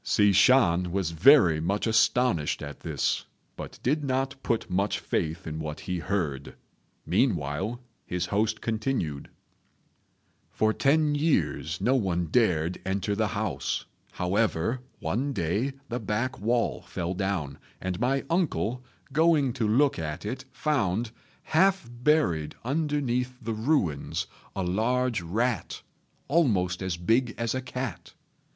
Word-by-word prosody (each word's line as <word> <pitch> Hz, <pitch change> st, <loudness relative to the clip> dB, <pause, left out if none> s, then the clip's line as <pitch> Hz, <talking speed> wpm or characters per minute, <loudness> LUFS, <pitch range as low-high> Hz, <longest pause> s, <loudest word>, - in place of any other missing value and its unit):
Hsi 105 Hz, -2 st, +4 dB
Shan 95 Hz, -5 st, +4 dB
was 95 Hz, -3 st, -1 dB
very 85 Hz, -, +6 dB
much 100 Hz, +5 st, 0 dB
astonished 110 Hz, -8 st, +2 dB
at 70 Hz, 0 st, -7 dB
this, -, -, -1 dB, 0.3 s
but -, -, -8 dB
did 150 Hz, +4 st, +1 dB
not 135 Hz, 0 st, 0 dB
put 115 Hz, -3 st, -1 dB
much 100 Hz, +3 st, 0 dB
faith 80 Hz, +1 st, -2 dB
in 80 Hz, 0 st, -5 dB
what 75 Hz, -1 st, -5 dB
he 90 Hz, -1 st, -3 dB
heard; 80 Hz, -7 st, -2 dB, 0.5 s
meanwhile 95 Hz, -, 0 dB, 0.3 s
his 90 Hz, 0 st, -1 dB
host 105 Hz, +4 st, 0 dB
continued, 110 Hz, -, -2 dB, 1.2 s
"For 110 Hz, 0 st, +1 dB
ten 150 Hz, +3 st, +3 dB
years 145 Hz, -, 0 dB
no 130 Hz, -, +2 dB
one 95 Hz, -9 st, +1 dB
dared 90 Hz, -7 st, +2 dB
enter 100 Hz, +2 st, -1 dB
the 110 Hz, +1 st, +1 dB
house; -, -, -2 dB, 0.3 s
however, 100 Hz, +4 st, 0 dB, 0.2 s
one 125 Hz, -, -1 dB
day 100 Hz, -, -1 dB, 0.2 s
the 120 Hz, +1 st, -2 dB
back 115 Hz, +5 st, -2 dB
wall 115 Hz, +3 st, 0 dB
fell 85 Hz, +1 st, -4 dB
down, 90 Hz, -7 st, -2 dB, 0.2 s
and 95 Hz, 0 st, -3 dB
my 135 Hz, +3 st, +1 dB
uncle, 135 Hz, -, 0 dB, 0.3 s
going 155 Hz, -4 st, +3 dB
to 115 Hz, -2 st, -1 dB
look 130 Hz, +4 st, +3 dB
at 75 Hz, +3 st, -4 dB
it, 125 Hz, +5 st, -4 dB
found, 120 Hz, -, 0 dB, 0.3 s
half 190 Hz, -2 st, +2 dB
buried 120 Hz, -, +1 dB
underneath 130 Hz, -3 st, -1 dB
the 115 Hz, -3 st, -3 dB
ruins, 110 Hz, -, 0 dB, 0.3 s
a 95 Hz, -, -1 dB
large 115 Hz, +5 st, +1 dB
rat, 110 Hz, +7 st, -2 dB, 0.4 s
almost 100 Hz, -, +2 dB
as 95 Hz, -2 st, -2 dB
big 115 Hz, +7 st, +1 dB
as 115 Hz, -1 st, -1 dB
a 130 Hz, -, -2 dB
cat. 125 Hz, -2 st, -6 dB
110 Hz, 130 wpm, -27 LUFS, 90-130 Hz, 1.2 s, very